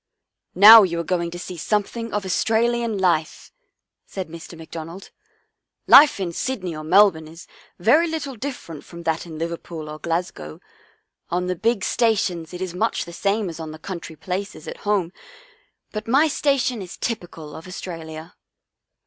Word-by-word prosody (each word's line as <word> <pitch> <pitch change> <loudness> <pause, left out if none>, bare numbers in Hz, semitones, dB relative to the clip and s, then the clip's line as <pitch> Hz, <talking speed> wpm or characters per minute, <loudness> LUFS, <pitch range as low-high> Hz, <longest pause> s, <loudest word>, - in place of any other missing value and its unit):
" - - -53
Now 220 +4 +11
you 170 -4 0
are - - -1
going 170 0 -1
to 175 - -7
see 180 0 -7
something 215 +5 -2
of 205 -1 -2
Aus 185 - 0
tralian 230 -1 +1
life," 170 -4 0 0.6
said 190 -4 -6
Mr. 165 +1 -10
McDonald. 165 +3 -9 0.4
" - - -56 0.3
Life 290 -6 +8
in 175 -3 -3
Sydney 185 -7 -3
or 155 - -7
Melbourne 170 -1 +4
is 165 +2 -12 0.3
very 290 - +4
little 310 -5 -4
different 220 - -7
from 170 0 -11
that 165 +1 -1
in 160 -2 -8
Liverpool 165 -1 -5
or 155 0 -8
Glasgow. 165 - -4 0.7
On 180 +1 -1
the 180 0 -1
big 220 +2 0
sta 230 -2 +2
tions 175 -6 -3
it 180 +1 -5
is 180 -2 -5
much 220 +6 -1
the 170 - -10
same 200 +3 0
as 165 -1 -7
on 160 -1 -6
the 155 - -8
country 170 -1 -7
places 180 -1 -5
at - - -6
home, 190 -4 +1 0.8
but 215 0 -6
my 275 +7 +4
station 270 -5 0
is 180 -2 -9
typical 175 -9 -5
of 165 - -10
Australia." 165 -3 -8
180 Hz, 175 wpm, -22 LUFS, 165-220 Hz, 0.8 s, Now